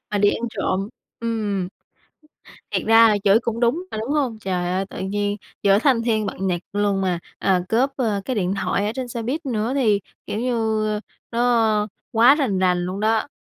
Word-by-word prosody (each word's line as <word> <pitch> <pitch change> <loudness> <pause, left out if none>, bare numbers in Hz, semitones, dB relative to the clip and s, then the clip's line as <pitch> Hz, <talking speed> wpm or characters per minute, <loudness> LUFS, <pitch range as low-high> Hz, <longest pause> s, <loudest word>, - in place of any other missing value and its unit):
Mà 205 - 0
đi 205 0 +5
ăn - - -5
trộm. 195 0 -1 0.3
Ừm. 210 -5 -2 1.0
Thiệt - - -1
ra 225 +1 +7
là 210 - +3
chửi 205 +2 +5
cũng 235 -1 -3
đúng 245 +9 +1
mà, - - -4
đúng 220 +4 -4
hông? 265 -7 0
Trời 180 -3 -2
ơi, 190 +1 0
tự - - -8
nhiên 205 +1 -1 0.3
giữa 200 0 +5
thanh 255 -2 +3
thiên 220 -2 +1
bạch 195 - -5
nhật 180 -3 0
luôn 205 -1 +1
mà, 180 -2 0 0.2
à, 190 -2 +2
cướp, 250 +5 +3
ơ, 215 -6 0
cái 255 - -2
điện 190 -2 0
thoại 200 - 0
ở 210 - 0
trên 260 -2 -3
xe 235 -1 -5
buýt 275 +8 -3
nữa 230 -1 -1
thì, 215 -7 +3 0.3
kiểu 210 - -3
như, 220 -3 0 0.3
nó 230 -3 +2 0.2
quá 235 +5 +6
rành 240 -11 0
rành 180 -1 +2
luôn 185 +2 -4
đó. 220 +4 +1
215 Hz, 200 wpm, -22 LUFS, 200-235 Hz, 1.0 s, ra